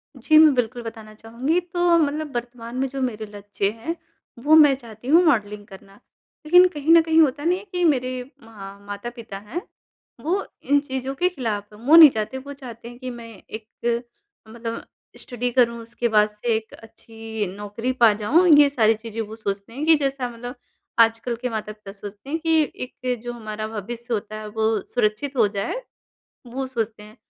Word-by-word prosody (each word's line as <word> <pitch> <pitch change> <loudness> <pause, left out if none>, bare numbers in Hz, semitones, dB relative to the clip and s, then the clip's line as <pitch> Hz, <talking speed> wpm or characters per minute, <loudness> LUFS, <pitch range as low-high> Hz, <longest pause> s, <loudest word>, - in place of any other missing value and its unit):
जी, 310 +5 +3
मैं 310 -2 +8
बिल्कुल 245 0 -1
बताना 220 -1 -9
चाहूँगी, 240 +10 -1
तो 350 -1 +2
मतलब 295 -2 -1
वर्तमान 240 0 -6
में 270 - +1
जो 270 +1 -5
मेरे 220 -4 -2
लक्ष्य 205 -1 -2
हैं, 230 +10 -5 0.4
वो 300 +5 +5
मैं 295 -3 +7
चाहती 235 -2 -13
हूँ 335 +5 +6
मॉडलिंग 210 -8 +1
करना, 195 0 -15 0.5
लेकिन 360 +3 +7
कहीं 305 -2 -1
न 335 - +8
कहीं 320 0 +2
होता 290 0 +2
नहीं 355 +2 +2
है 415 - -13
कि 355 -1 -1
मेरे 255 -5 +1 0.2
म 200 -3 -11
माता-पिता 220 0 -7
हैं 335 +11 -4 0.6
वो 370 +6 -1 0.2
इन 285 +1 +3
चीज़ों 265 -1 -4
के 360 +5 +2
खिलाफ़ 210 - -4
हैं। 210 - -16
वो 320 - +7
नहीं 320 -3 +11
चाहते 220 +3 -4
वो 280 +2 -8
चाहते 235 -4 -10
हैं 240 - -12
कि 255 -1 -6
मैं 235 -1 -8 0.2
एक 220 0 -7 0.8
मतलब 230 0 -6 0.4
स्टडी 245 -1 -3
करूँ 235 -2 +3
उसके 235 +1 -3
बाद 210 -1 +4
से 220 +2 -1
एक 220 0 -5
अच्छी 225 -1 -7
नौकरी 210 +5 -3
पा 230 - +8
जाऊँ 325 - +4
ये 285 -1 +6
सारी 225 -5 +3
चीज़ें 225 0 -6
वो 220 0 -7
सोचते 200 0 -5
हैं 290 +4 -3
कि 325 0 +7
जैसा 275 -3 -2
मतलब 245 +2 -8 0.4
आजकल 230 +1 +3
के 250 - -1
माता-पिता 215 -2 -6
सोचते 205 +5 -10
हैं 320 - -1
कि 320 -1 +4 0.4
एक 250 -2 0
जो 240 - -5
हमारा 215 -2 -5
भविष्य 230 +3 -6
होता 215 0 -3
है 215 - -7
वो 220 +1 0 0.2
सुरक्षित 245 +4 0
हो 220 - +5
जाए, 200 - -3 0.7
वो 260 +2 -4
सोचते 225 -4 -4
हैं 215 +3 -15
235 Hz, 185 wpm, -23 LUFS, 215-280 Hz, 0.8 s, नहीं